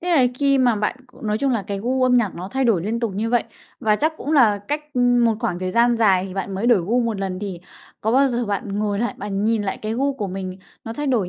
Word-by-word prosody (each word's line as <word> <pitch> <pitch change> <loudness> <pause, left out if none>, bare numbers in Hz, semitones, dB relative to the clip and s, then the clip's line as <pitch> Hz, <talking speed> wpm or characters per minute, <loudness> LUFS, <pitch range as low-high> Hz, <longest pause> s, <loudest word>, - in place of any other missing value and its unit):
Thế 355 +1 -3
là 275 -7 +5
khi 275 +1 +2
mà 245 -3 +3
bạn 210 +4 -1
c 250 - -24
nói 210 -1 -1
chung 275 +3 +1
là 225 -5 0
cái 200 0 -4
gu 255 +5 0
âm 250 -1 +4
nhạc 220 -6 +1
nó 180 +3 -6
thay 265 +2 -1
đổi 200 -8 +2
liên 225 +3 -2
tục 230 -5 -1
như 225 +3 -2
vậy, 240 -2 +2 0.4
và 215 -1 +2
chắc 315 +5 +1
cũng 300 - -4
là 230 -9 +5
cách 300 -1 -4
một 245 -2 +3
khoảng 215 -8 -1
thời 185 0 -3
gian 235 +2 +3
dài 195 -5 +3
thì 185 - -9
bạn 195 0 -3
mới 200 +5 -1
đổi 235 -6 +5
gu 230 +9 +1
một 230 -4 -1
lần, 190 -2 -3
thì 190 -4 -5 0.4
có 220 - 0
bao 270 +2 +4
giờ 240 -1 -1
bạn 200 0 -3
ngồi 205 -1 -1
lại, 240 +2 -1
bạn 200 0 -3
nhìn 225 -1 +1
lại 195 -1 -3
cái 220 +1 -2
gu 275 +3 +1
của 215 -6 -3
mình, 185 0 -5 0.3
nó 225 - -5
thay 295 +4 -4
đổi 225 -9 +1
225 Hz, 285 wpm, -22 LUFS, 200-250 Hz, 0.4 s, là